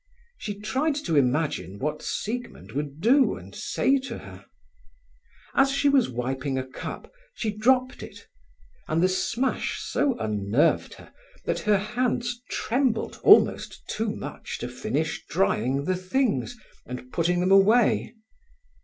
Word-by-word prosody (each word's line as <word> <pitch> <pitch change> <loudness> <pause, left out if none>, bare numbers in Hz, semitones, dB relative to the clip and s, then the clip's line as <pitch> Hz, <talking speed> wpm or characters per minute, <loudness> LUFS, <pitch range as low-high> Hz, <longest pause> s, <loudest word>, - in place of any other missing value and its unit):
She 205 -1 -5
tried 270 +8 0
to 285 - -2
imagine 130 - +1
what 150 +6 -3
Siegmund 240 +3 -5
would 145 +2 -4
do 260 +6 +4
and - - -12
say 275 0 +1
to 270 - -6
her. - - -12 1.1
As 270 0 +4
she 280 +1 +2
was 275 -4 +3
wiping 130 +2 -2
a 130 - -2
cup, 130 - -8 0.2
she 215 -2 -2
dropped 255 +3 +2
it, - - -11 0.6
and 160 +2 +1
the - - +6
smash 235 +7 -1
so 270 -4 0
unnerved 105 +4 +1
her - - -16 0.3
that - - 0
her 210 -2 +3
hands 240 +3 -1
trembled 245 -1 -1
almost - - +4
too 220 0 -2
much - - -6
to - - -5
finish - - -2
drying 130 +8 +1
the 185 - +1
things 240 +5 -1 0.3
and 125 0 -8
putting 175 +1 +1
them 185 +2 +1
away. 215 +4 +4
205 Hz, 135 wpm, -26 LUFS, -, 1.1 s, the